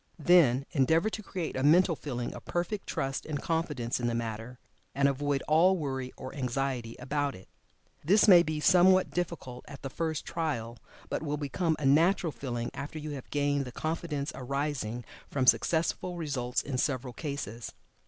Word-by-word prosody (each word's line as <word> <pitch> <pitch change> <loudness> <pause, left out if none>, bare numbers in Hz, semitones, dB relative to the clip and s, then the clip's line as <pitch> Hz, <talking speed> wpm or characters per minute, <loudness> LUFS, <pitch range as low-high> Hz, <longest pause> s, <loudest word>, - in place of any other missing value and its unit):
Then, 145 -6 +5
endeavor 160 +7 +2
to 215 - -4
create 180 -5 -4
a 130 - -1
mental 165 +4 +5
feeling 125 -5 -4
of - - -9
perfect 175 +4 -2
trust 135 0 -2
and 150 -2 -4
confidence 150 -9 -1
in 120 - -1
the 120 - 0
matter, 115 +1 -4 0.4
and 140 0 +4
avoid 140 0 0
all 175 +5 +5
worry 130 -4 -3
or 130 - -7
anxiety 130 -3 -2
about 140 +2 -2
it. 95 - -14 0.6
This 200 +8 +5
may 180 -4 +9
be 155 -2 -2
somewhat 185 +3 +5
difficult 165 -8 -4
at 140 - -11
the 135 - -5
first 160 -1 -2
trial, 120 -9 -3 0.3
but - - -2
will 150 -1 -2
become 155 +3 0
a 150 - -3
natural 165 +5 +4
feeling 120 -4 -4
after 145 +3 -6
you 155 0 -5
have 135 -3 -7
gained 145 -1 +1
the 125 - -7
confidence 155 0 -3
arising 130 -3 -3 0.2
from 135 -2 0
successful 170 +5 +2
results 130 -6 -2
in 130 -3 -3
several 130 -3 -1
cases. 120 -6 -5
145 Hz, 170 wpm, -30 LUFS, 130-165 Hz, 0.6 s, may